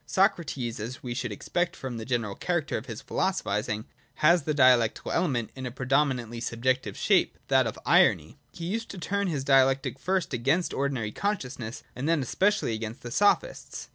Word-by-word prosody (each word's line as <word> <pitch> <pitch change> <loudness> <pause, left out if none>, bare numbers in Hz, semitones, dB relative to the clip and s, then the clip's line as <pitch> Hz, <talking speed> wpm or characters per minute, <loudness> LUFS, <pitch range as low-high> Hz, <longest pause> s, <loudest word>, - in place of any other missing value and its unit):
Socrates, 165 - 0
as 115 +4 -6
we 125 -2 -3
should 120 -1 -3
expect 175 - -2
from 130 -3 -6
the 110 - -6
general 115 -5 -1
character 175 - -1
of 115 - -4
his 115 -3 -7
philosophising, 105 - -1 0.3
has 170 +3 +4
the 150 +2 -1
dialectical 125 -5 +4
element 125 -10 0
in 130 -1 -5
a - - -5
pre 125 +1 -6
dominantly 125 -4 +1
subjective 125 +2 -1
shape, - - +2
that - - +4
of - - -5
Irony. - - +3
He 165 - -7
used 225 +6 -3
to 195 - -7
turn 200 +4 -1
his 150 -6 -2
Dialectic, 135 -1 +3
first 185 -1 -1
against 140 +9 +1
ordinary 135 -6 -1
consciousness, 130 - -3
and 135 +5 -2
then 165 -4 +2
especially 190 - +1
against 110 +1 -5
the 120 - -6
Sophists. 205 - 0
130 Hz, 175 wpm, -27 LUFS, 120-170 Hz, 0.3 s, has